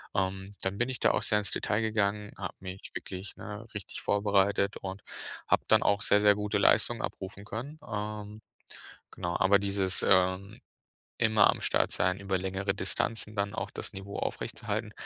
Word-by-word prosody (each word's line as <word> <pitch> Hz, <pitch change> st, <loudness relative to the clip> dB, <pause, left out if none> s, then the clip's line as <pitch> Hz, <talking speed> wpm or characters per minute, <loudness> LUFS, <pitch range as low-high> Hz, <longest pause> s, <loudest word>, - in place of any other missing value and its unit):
ähm, 95 Hz, +1 st, -2 dB
dann 95 Hz, +1 st, -2 dB
bin 120 Hz, -, +1 dB
ich 130 Hz, -, -3 dB
da -, -, +5 dB
auch -, -, 0 dB
sehr 105 Hz, -, +4 dB
ins 105 Hz, -, +1 dB
Detail 105 Hz, +2 st, 0 dB
gegangen, 105 Hz, -1 st, 0 dB
habe 90 Hz, -3 st, -5 dB
mich 95 Hz, 0 st, -8 dB
wirklich, 95 Hz, +1 st, -7 dB
ne, 105 Hz, +2 st, -7 dB
richtig 105 Hz, -3 st, -5 dB
vorbereitet 100 Hz, -1 st, +2 dB
und 95 Hz, +1 st, -6 dB, 0.5 s
habe -, -, +3 dB
dann -, -, +5 dB
auch 100 Hz, 0 st, +2 dB
sehr, 105 Hz, 0 st, +4 dB
sehr 105 Hz, -1 st, +6 dB
gute 105 Hz, 0 st, -1 dB
Leistungen -, -, +3 dB
abrufen 95 Hz, +1 st, -5 dB
können, 125 Hz, +9 st, -6 dB
ähm, 105 Hz, 0 st, -5 dB, 0.7 s
genau. 85 Hz, -2 st, -4 dB
Aber 100 Hz, +1 st, +5 dB
dieses, 100 Hz, -1 st, +1 dB
ähm, 95 Hz, +2 st, +2 dB, 0.6 s
immer 110 Hz, -1 st, +5 dB
am -, -, 0 dB
Start -, -, +2 dB
sein, 90 Hz, +1 st, +1 dB
über 100 Hz, -1 st, 0 dB
längere 95 Hz, +1 st, -2 dB
Distanzen 105 Hz, +3 st, -1 dB
dann 100 Hz, 0 st, 0 dB
auch -, -, -3 dB
das -, -, -4 dB
Niveau 100 Hz, +1 st, -7 dB
aufrechtzuerhalten, -, -, -3 dB
100 Hz, 170 wpm, -30 LUFS, 95-105 Hz, 0.7 s, sehr